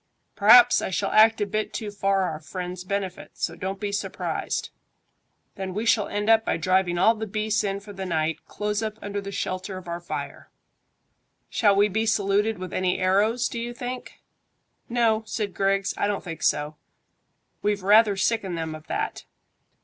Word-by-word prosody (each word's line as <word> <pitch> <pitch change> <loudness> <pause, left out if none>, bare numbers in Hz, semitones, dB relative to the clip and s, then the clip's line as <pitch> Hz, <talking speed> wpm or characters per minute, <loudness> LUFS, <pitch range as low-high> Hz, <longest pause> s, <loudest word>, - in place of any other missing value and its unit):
"P'r'aps 365 -1 +7
I - - -2
shall 185 - -1
act 220 0 +5
a - - +2
bit 215 +2 -3
too 215 -3 -4
for 195 -1 +1
our 160 -4 -3
friends' 180 +3 -6
benefit, 190 -1 -4
so 170 - -2
don't 190 +2 -4
be 205 -1 -3
surprised. 200 - -3 0.9
Then 190 -1 -5
we 215 +2 -2
shall 225 -3 +3
end 205 +1 -3
up 225 0 +5
by - - 0
driving 185 +1 +1
all 220 +6 +5
the 220 0 -5
beasts 215 +1 0
in 200 -1 -2
for 205 0 -11
the 190 -1 -5
night 160 -2 -1
close 210 0 -2
up 215 -1 -4
under 205 0 -3
the 200 0 -7
shelter 185 0 -4
of 185 -2 -10
our 170 0 -4
fire." 175 - -6 1.0
"Shall 205 -3 +3
we 205 +1 +4
be 220 +3 -1
saluted 210 0 +1
with 185 0 -7
any 185 -1 0
arrows, 205 +6 +2
do 235 - -5
you 240 +1 -5
think?" 250 +1 -7 0.7
"No," 230 -2 +2
said 210 -4 -3
Griggs; 195 0 +1
"I - - 0
don't 205 -1 -2
think 165 -3 -7
so. 150 +1 0 0.8
We've 205 -2 0
rather 210 0 +5
sickened 195 -4 0
them 160 -1 -3
of 155 0 -11
that. - - -3
200 Hz, 180 wpm, -25 LUFS, 185-215 Hz, 1.0 s, P'r'aps